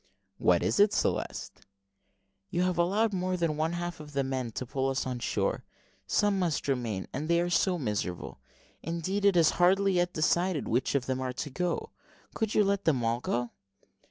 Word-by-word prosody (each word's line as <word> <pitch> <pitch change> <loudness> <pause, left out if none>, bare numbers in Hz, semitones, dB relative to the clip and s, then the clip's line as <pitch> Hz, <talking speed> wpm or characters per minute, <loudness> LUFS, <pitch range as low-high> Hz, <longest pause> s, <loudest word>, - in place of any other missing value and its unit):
"What 85 -1 +3
is 100 +7 +1
it, 205 0 +5
Celeste?" - - -2 0.9
"You 175 - 0
have 180 -1 0
allowed 205 +5 +2
more 185 0 -1
than 165 -3 0
one 160 +2 0
half 175 -1 -4
of 150 -1 -10
the 140 0 +1
men 130 -2 -2
to 130 - -4
pull 135 +2 -1
us 135 0 -1
on 125 -1 -3
shore; - - -1 0.4
some 205 -2 +2
must 170 -6 -1
remain, 120 -8 -1
and 150 +4 -3
they 170 0 +3
are 175 0 0
so 180 +1 +2
miserable 105 - -3 0.4
indeed 170 +5 -2
it 195 -3 +5
is 165 -2 +5
hardly 195 +2 +4
yet 175 0 +1
decided 170 +1 +1
which 125 +4 0
of 135 -3 +1
them 130 0 -2
are 130 -1 -2
to 140 +2 -5
go. 175 +5 -2 0.4
Could 220 -2 -2
you 210 - +5
let 200 0 0
them 135 -7 +2
all 115 +1 +1
go?" 120 -1 -2
165 Hz, 190 wpm, -29 LUFS, 130-180 Hz, 0.9 s, it